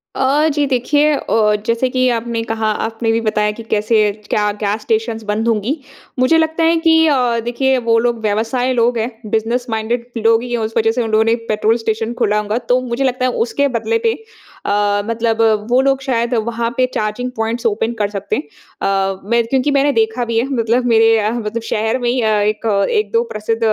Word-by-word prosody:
अ, 280 +4 +2
जी 290 0 +1
देखिए 290 +4 +2
अ, 215 -6 +1
जैसे 230 +3 +1
कि 255 0 +1
आपने 230 -1 -2
कहा, 225 -1 -2 0.2
आपने 225 0 -2
भी 225 - +1
बताया 210 -1 0
कि - - -6
कैसे, 215 -1 +1 0.2
क्या 210 0 +1
गैस 210 +1 -1
स्टेशन्स 225 0 -1
बंद 215 +2 -2
होंगी। 230 +7 0 0.4
मुझे 255 +6 +4
लगता 320 +1 +1
है 330 +1 +4
कि 320 0 +5
अ, 250 -5 +2
देखिए, 265 +2 +1
वो 230 -2 +2
लोग 235 0 0
व्यवसाय 230 +4 0
लोग 240 0 +2
हैं, 230 +2 -2 0.2
बिज़नेस 230 +3 0
माइंडेड 230 +2 -2
लोग 225 +1 +3
ही 245 - -7
हैं, 240 - 0
उस 220 0 -3
वजह 225 0 +3
से 245 +2 -1
उन 225 - -4
लोगों 215 0 +4
ने 225 - +2
एक 230 0 -2
पेट्रोल 215 +2 +2
स्टेशन 225 0 -2
खोला 210 +1 +2
होगा। 210 +1 -2
तो 250 +1 +4
मुझे 250 +1 -2
लगता 255 -1 0
है, 255 - +1 0.2
उसके 285 +4 0
बदले 455 - 0
पे 450 - 0 0.5
अ, 205 0 +1
मतलब 230 0 -1 0.3
वो 250 +2 +4
लोग 270 0 +1
शायद 240 -2 -1
वहाँ 235 0 -2
पे 255 - +4
चार्जिंग 215 +4 -2
पॉइंट्स 225 +2 -3
ओपन 225 +1 0
कर 205 - 0
सकते 200 -1 -3
हैं। - - -3 0.4
अ, 195 -1 0
मेर 235 0 +2
क्योंकि 270 +2 +1
मैंने 280 +1 +3
देखा 225 +2 0
भी 230 -1 -2
है, 235 - 0
मतलब 235 +2 +1
मेरे 225 -1 +4
अ, 210 0 0
मतलब 230 -1 -3
शहर 220 +3 0
में 240 - -1
ही 250 +1 0
अ, 220 - +1
एक, 210 +2 -1 0.3
1-2 460 +1 +1
प्रसिद्ध 220 +2 -2
230 Hz, 210 wpm, -17 LUFS, 220-250 Hz, 0.5 s, कि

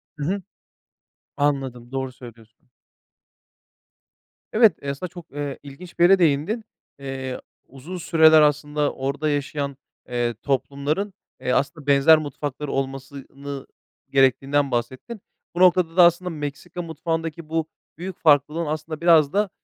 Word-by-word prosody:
Hı 150 - -6
hı. 195 +5 -1 1.0
Anladım, 135 -4 -1
doğru 130 -1 -3
söylüyorsun. 115 -1 -15 1.8
Evet, 220 -1 +6
eee, 140 - -4
aslında 140 +6 -4
çok, 175 -1 -12
eee, 145 -1 -5
ilginç 145 +6 -12
bir - - +5
yere 190 +2 +6
değindin. 170 +8 +1 0.4
Eee, 135 -1 -5 0.3
uzun 140 +8 -9
süreler 160 -2 +6
aslında 150 0 +1
orada 140 +3 -2
yaşayan, 140 -1 -2 0.3
eee, 120 -1 0
toplumların, 145 +8 -1 0.3
eee, 125 - -1
aslında 145 +3 -1
benzer 140 +3 +6
mutfakları 145 -1 -5
olmasını 135 +1 -5 0.4
gerektiğinden 135 +1 +2
bahsettin. 130 - -4 0.3
Bu - - -3
noktada 180 -2 +4
da 180 - +9
aslında 175 +1 +4
Meksika 155 +2 -6
mutfağındaki 165 0 -4
bu 160 -1 -1 0.3
büyük 180 +1 -7
farklılığın 150 +2 +3
aslında 155 +1 -4
biraz 160 -4 +5
da 205 0 +1
145 Hz, 125 wpm, -23 LUFS, 135-165 Hz, 1.8 s, da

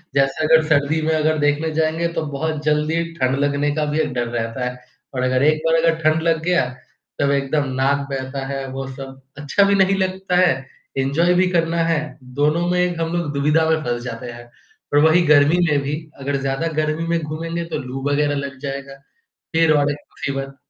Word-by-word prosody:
जैसे 135 +3 +2
अगर 160 0 +5
सर्दी 150 +1 +2
में 160 +1 +1
अगर 155 0 +1
देखने 145 +2 +1
जाएँगे 160 +2 0
तो - - -1
बहुत 155 +1 -3
जल्दी 155 +2 +1 0.2
ठंड 130 +1 +2
लगने 145 0 +1
का 155 -1 0
भी 155 - 0
एक 150 -4 0
डर 120 -1 -1
रहता 115 +1 -3
है 125 - -9 0.4
और 125 - -2
अगर 130 +1 +2
एक 155 +1 +3
बार 165 - +3
अगर 165 -1 +3
ठंड 155 +1 +3
लग 165 -1 +2
गया 175 -6 +2 0.6
सब 140 0 +2
एकदम 140 +1 0
नाक 140 +2 +1
बहता 135 0 -4
है, 135 0 -4
वो 135 +1 -5
सब 135 0 -9 0.2
अच्छा 145 +7 +2
भी 200 0 +3
नहीं 195 0 +3
लगता 190 -1 -1
है। 175 -8 +3 0.3
एन्जॉय 145 +7 +2
भी 185 +1 +3
करना 165 -1 +1
है, 155 -2 -1
दोनों 150 +7 0
में 180 0 +1
एक 175 -2 0
हम 165 0 -1
लोग 170 -4 -1
दुविधा 150 +3 +2
में 160 -1 +2
फँस 120 0 -2
जाते 120 0 -6
हैं। 120 0 -11 0.5
पर 145 - +3
वही 170 +2 +4
गर्मी 150 +2 +5
में 145 -1 +2
भी 145 +2 -2 0.2
अगर 140 +1 -2
ज़्यादा 135 +4 -1
गर्मी 155 +2 -1
में 170 0 +1
घूमेंगे 165 +2 -4
तो 165 - -4
लू 130 +1 -6
वगैरह 145 0 +1
लग 140 -1 -5
जाएगा। 140 -1 -6 0.6
फिर 160 -1 +4
और 145 -1 +2
एक 145 - -2
मुसीबत। 135 0 -5
150 Hz, 205 wpm, -20 LUFS, 135-160 Hz, 0.6 s, अगर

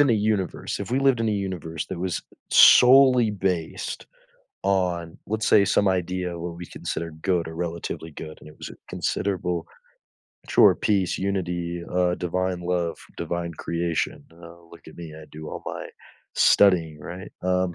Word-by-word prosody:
in 140 -4 +5
a - - +5
universe 105 -3 -1
if - - -5
we 130 - +2
lived 135 -3 +3
in 115 - +1
a - - +1
universe 90 -6 -4
that 95 - -6
was 90 -3 -2 0.3
solely 125 -3 +7
based 95 -5 -3 0.6
on, 90 -4 0
let's 110 0 -2
say, 100 -1 +6
some 100 - +2
idea 90 -1 -1
of - - -8
what 85 0 -5
we 90 0 -8
consider 85 - -5
good 90 -3 +1
or 80 - -8
relatively 85 -1 -5
good, 75 +1 -9
and - - -13
it 75 - -14
was - - -7
a - - -11
considerable 90 -3 -2 0.8
Sure, - - +6
peace, 100 -4 0
unity, 85 -3 -2
uh, 90 -1 +2
divine 90 +1 -2
love, 85 -1 -1 0.2
divine 85 -1 -3
creation. 85 -1 -2
"Oh, 85 0 -15
look 85 - -14
at 80 - -14
me, 85 -2 -8
I 80 0 -11
do 80 0 -8
all - - -7
my - - -5 0.5
studying," 85 -6 +4
right? 90 +4 -8
Um, 90 -1 0
90 Hz, 170 wpm, -24 LUFS, 85-95 Hz, 0.8 s, solely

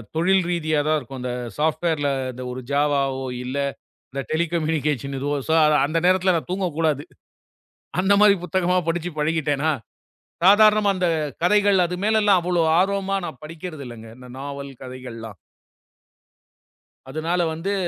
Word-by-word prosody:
தொழில் 185 +3 +3
ரீதியாகத்தான் 155 -3 +1
இருக்கும். 135 0 -9
இந்த 125 0 -3 0.3
சாஃப்ட்வேர்ல 155 -1 0 0.2
இந்த 125 +1 -8
ஒரு 125 - -5
ஜாவாவோ 140 -2 +1 0.2
இல்ல 130 +3 -4 0.6
இந்த 140 - -3
டெலிகம்யூனிகேஷன் 155 -4 -1
எதோ 140 +2 -2 0.2
சோ - - +1 0.3
அந்த 155 +3 0
நேரத்துல 185 0 +4
நான் 165 - -4
தூங்கக்கூடாது. 165 -6 0 1.0
அந்த 190 +2 +3
மாதிரி 210 -1 +7
புத்தகமா 180 +1 +1
படிச்சுப் 170 -1 -2
பழகிட்டேனா, 150 -1 0 0.7
சாதாரண 215 +2 +6
அந்தக் 165 -6 -1
கதைகள். 205 0 +4
அது 175 +1 -3
மேல 220 +1 +3
எல்லாம் 200 -3 +5
அவ்வளவு 175 -2 +1
ஆர்வமா 195 +1 0
நான் 130 - -8
படிக்கிறதில்லைங்க. 150 -9 -8
இந்த 125 0 -13
நாவல் 140 0 -6
கதைகள்லாம். 120 -5 -9 1.7
அதனால 160 +5 -1
வந்து 175 +5 -3
160 Hz, 125 wpm, -23 LUFS, 140-180 Hz, 1.7 s, மாதிரி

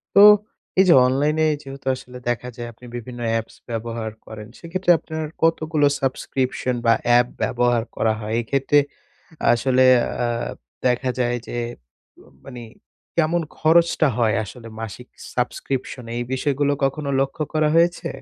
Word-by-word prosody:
তো, - - +8 0.6
এই - - +8
যে - - +9
অনলাইনে 150 +5 +1 0.2
যেহেতু 135 -1 -10
আসলে 125 0 -11
দেখা 120 +1 -2
যায় 120 -1 -6
আপনি 115 +2 -16
বিভিন্ন 120 +1 -7
অ্যাপস 115 0 -2
ব্যবহার 115 -1 -4
করেন, 110 -1 -9
সেক্ষেত্রে 180 +2 0
আপনার 160 0 -5 0.2
কতগুলো 155 -2 +2
subscription 130 -1 -1
বা 115 - +6
অ্যাপ 120 0 +5 0.2
ব্যবহার 120 -1 +1
করা 110 - +1
হয়? 110 0 -4
এক্ষেত্রে, 135 +4 +2 0.7
আসলে 130 +2 +2 0.4
আ - - +2 0.6
দেখা 125 +1 +1
যায় 120 -1 +1
যে - - -5 0.6
মা - - -20 0.2
মানি 120 -1 -8 0.5
কেমন 170 +1 +2 0.2
খরচটা 165 0 +4
হয় 115 -3 +2
আসলে 115 +2 -10
মাসিক 115 +3 -7 0.3
subscription? 125 +1 -3
এই 120 - -1
বিষয়গুলো 145 +1 +1
কখনো 140 +1 -1
লক্ষ্য 135 +3 -2
করা 155 -1 +2
হয়েছে? 170 +1 +2
130 Hz, 140 wpm, -22 LUFS, 120-150 Hz, 0.7 s, যে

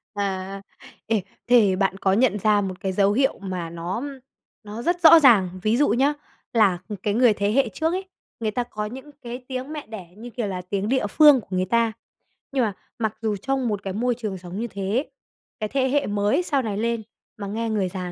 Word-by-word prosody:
À. 195 -1 -3 0.5
Ê, 220 -3 +1 0.3
thế 220 -6 +5
bạn 195 0 0
có 190 -1 +1
nhận 220 -2 +2
ra 210 0 +3
một 185 -1 -4
cái 190 -2 -2
dấu 200 +1 +3
hiệu 265 +3 +2
mà 185 -4 -4
nó 170 +7 -4 0.6
nó 215 +3 -7
rất 350 +5 0
rõ 325 0 +9
ràng, 190 - +4
ví 215 +3 +2
dụ 290 - +3
nhá, 275 +5 +3 0.4
là 205 -6 +4 0.3
cái 205 - +1
người 240 -1 +5
thế 200 +1 0
hệ 265 -1 +2
trước 320 - -1
ấy, 380 +1 -3 0.3
người 220 -2 -1
ta 245 +3 -1
có 215 -3 -5
những 265 +6 -8
cái 245 +1 -7
tiếng 260 +3 -5
mẹ 295 -7 -7
đẻ 205 -6 -8
như 240 +2 -8
kiểu 235 -3 -3
là 185 -2 -4
tiếng 195 +3 -3
địa 260 -5 +1
phương 290 +1 +6
của - - -21
người 185 0 +1
ta, 230 +2 +2 0.6
nhưng 265 -3 +1
mà 210 -3 0 0.3
mặc 220 -1 -1
dù 215 -2 0
trong 265 +3 -1
một 205 -2 -2
cái 190 -1 -4
môi 240 +3 0
trường 215 -5 -4
sống 180 +3 -7
như 235 - -2
thế, 200 +8 -2 0.5
cái 215 -1 -2
thế 265 -1 +1
hệ 285 +1 +1
mới 205 - +1
sau 280 -5 +1
này 210 -4 -3
lên 230 0 -1 0.3
mà 200 -1 -5
nghe 225 +3 -2
người 200 -4 0
già 180 -1 -5
215 Hz, 220 wpm, -24 LUFS, 195-250 Hz, 0.6 s, rõ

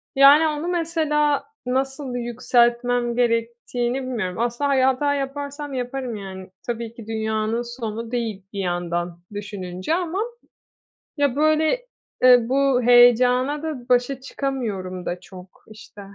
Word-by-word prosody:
Yani, 285 +4 +7
onu 305 +2 -2
mesela 315 -4 +1 0.2
nasıl 265 +1 -2
yükseltmem 240 0 +1
gerektiğini 240 +1 -1
bilmiyorum. 220 -7 -3
Aslında, 240 +4 0
hani, 270 -2 +3
hata 265 +2 +2
yaparsam 285 +1 -4
yaparım; 250 -1 -3
yani, 190 -2 -8 0.2
tabii 230 -1 -4
ki 235 -2 -11
dünyanın 220 +1 -1 0.2
sonu 225 0 -4
değil 225 -6 -3
bir 200 - -4
yandan 175 -1 -2
düşününce 195 - -4
ama 360 +1 -2 1.0
ya, 285 -3 +1
böyle, 310 +10 +2 0.4
eee, 250 -1 +8
bu 270 -1 +3
heyecana 245 +4 +5
da 275 -6 -5
başa 250 +2 +2
çıkamıyorum 215 -10 -4
da 175 - -3
çok, 185 0 -13 0.2
işte. 210 -1 -13
245 Hz, 125 wpm, -23 LUFS, 220-275 Hz, 1.0 s, eee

